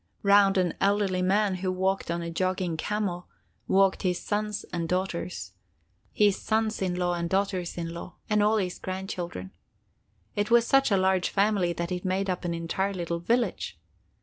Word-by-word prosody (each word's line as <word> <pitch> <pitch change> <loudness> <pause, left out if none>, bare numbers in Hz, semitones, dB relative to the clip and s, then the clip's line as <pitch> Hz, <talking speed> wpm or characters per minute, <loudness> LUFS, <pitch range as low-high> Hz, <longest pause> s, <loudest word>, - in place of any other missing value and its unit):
Round 200 -1 +5
an 180 -2 +2
elderly 200 -2 +2
man, 195 +1 +2
who 185 0 -1
rode 190 0 -1
on 170 0 -1
a 170 - -4
jogging 185 0 -1
camel, 185 0 -2 0.4
walked 195 0 +3
his 180 -2 0
sons 210 0 -2
and 170 -1 -2
daughters, 180 - -2 0.6
his 205 -2 +2
sons 220 -1 0
in 185 -2 0
law 180 0 0
and 170 -1 -2
daughters 190 -2 -1
in 165 -1 -4
law, 170 0 -8
and 210 -1 +2
all 215 +1 +3
his 185 -3 -2
grandchildren. 180 - -5 0.8
It 205 0 0
was 235 0 +5
such 270 +2 +4
a 200 - +3
large 190 -1 +2
family 200 -3 +2
that 170 +1 -4
it 180 -1 -3
made 190 0 0
up 180 - -4
an 170 -1 -1
entire 190 +4 -2
little 170 -1 -2
village. 235 +7 -1
185 Hz, 175 wpm, -27 LUFS, 175-200 Hz, 0.8 s, Round